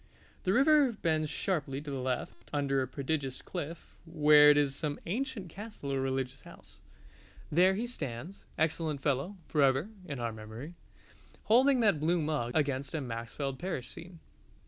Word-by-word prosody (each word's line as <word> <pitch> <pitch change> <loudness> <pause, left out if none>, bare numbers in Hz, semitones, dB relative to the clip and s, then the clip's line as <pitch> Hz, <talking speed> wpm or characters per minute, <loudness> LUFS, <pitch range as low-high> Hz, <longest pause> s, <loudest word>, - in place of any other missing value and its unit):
The 185 - +3
river 280 0 +5
bends 160 -6 0
sharply 145 -8 -2
to 145 0 -7
the 135 - -3
left 130 0 -4
under 140 -2 +1
a 130 - -1
prodigious 135 0 -3
cliff, 170 -2 -6
where 150 -3 +6
is 145 -2 +4
some 145 -1 -3
ancient 220 -2 -3
castle 195 -7 -6
or 135 - 0
religious 135 0 -2
house. - - -14 0.7
There 185 +4 +5
he 225 +4 -1
stands, 170 - -6
excellent 160 -2 0
fellow, 145 +8 0
forever 140 +4 +2 0.2
(in 140 -3 -4
our 115 -1 -2
memory) 110 +8 -8 0.7
holding 255 +3 +5
that 205 -9 +3
blue 170 +3 +2
mug 150 -6 -1
against 140 -1 0
a - - 0
Maxfield 125 +3 -4
Parrish 170 -9 -4
scene. 170 0 -10
150 Hz, 150 wpm, -31 LUFS, 135-180 Hz, 0.7 s, where